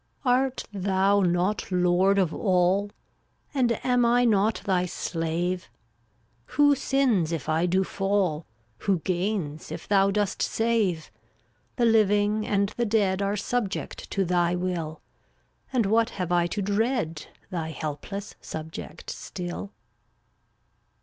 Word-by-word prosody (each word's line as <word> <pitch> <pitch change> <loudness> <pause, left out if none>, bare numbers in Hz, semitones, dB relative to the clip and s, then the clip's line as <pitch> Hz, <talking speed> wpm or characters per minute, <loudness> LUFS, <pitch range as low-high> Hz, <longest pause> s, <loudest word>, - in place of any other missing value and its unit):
344 250 -1 +4
Art 245 -7 -4
Thou 195 +1 +3
not 180 +3 0
Lord 180 +2 +3
of 185 -5 +2
All? 190 +1 +2 0.6
And 250 -4 +2
am 245 -1 +3
I 240 +1 +4
not 215 -1 +2
Thy 180 -2 +1
slave? 175 +2 -2 0.9
Who 290 -1 +6
sins 260 - +1
if 160 -5 -3
I 160 +2 +2
do 185 +2 +2
fall? 195 -5 -1 0.3
Who 195 -3 +1
gains 180 -4 -2
if - - -7
Thou 195 -1 +4
dost 205 0 -1
save? 220 -8 0 0.6
The 240 - +2
living 210 -1 +3
and 200 -1 +1
the 240 - +1
dead 200 -3 +2
Are 200 +1 0
subject 210 -1 -3
to 195 -1 0
Thy 175 0 +2
will; 175 -3 -3 0.7
And 245 -5 +2
what 225 +3 +3
have 180 -2 -2
I 175 -1 +3
to 200 +3 -3
dread, 205 - -1 0.2
Thy 165 -3 -3
helpless 160 +7 -5
subject 160 0 -7
still? 180 +2 -6
195 Hz, 130 wpm, -26 LUFS, 175-215 Hz, 0.9 s, Who